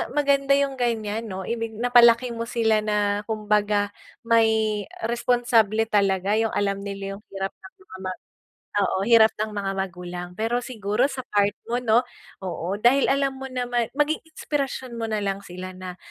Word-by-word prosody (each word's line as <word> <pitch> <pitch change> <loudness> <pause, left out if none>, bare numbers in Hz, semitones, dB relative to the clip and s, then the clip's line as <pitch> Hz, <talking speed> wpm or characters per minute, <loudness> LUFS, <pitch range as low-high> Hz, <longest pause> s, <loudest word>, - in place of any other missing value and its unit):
maganda 275 -1 +3
yung 275 -1 0
ganyan, 225 -2 -1
'no, 190 -2 -5
ibig 230 +1 -3
napalaki 240 +1 +5
mo 230 0 -4
sila 225 -2 +2
na 210 -1 0
kumbaga, 210 -2 +1 0.3
may 220 -3 +2 0.2
responsable 235 -3 +2
talaga. 200 0 +2
Yung 225 0 0
alam 200 -1 0
nila 195 0 -6
yung 210 - -26
hirap 195 0 -2
ng 190 - -16
mga 190 - -12
ma, 185 - -1 0.7
oo, 195 -1 +1
hirap 225 -2 +7
ng 215 0 -1
mga 200 -2 -2
magulang. 180 -2 -5
Pero 235 +3 0
siguro 215 -2 -1
sa 265 - -6 0.2
part 205 0 +4 0.2
mo 240 - +1
'no, 225 +1 +5 0.4
oo, 180 +1 -3
dahil 250 +5 +4
alam 275 -1 +1
mo 265 0 -6
naman, 245 -2 -1
maging 300 +1 +1
inspirasyon 275 -5 -4
mo - - -3
nalang 200 -2 -1
sila 185 +1 -7
na 185 -1 -8
220 Hz, 160 wpm, -24 LUFS, 200-240 Hz, 0.7 s, hirap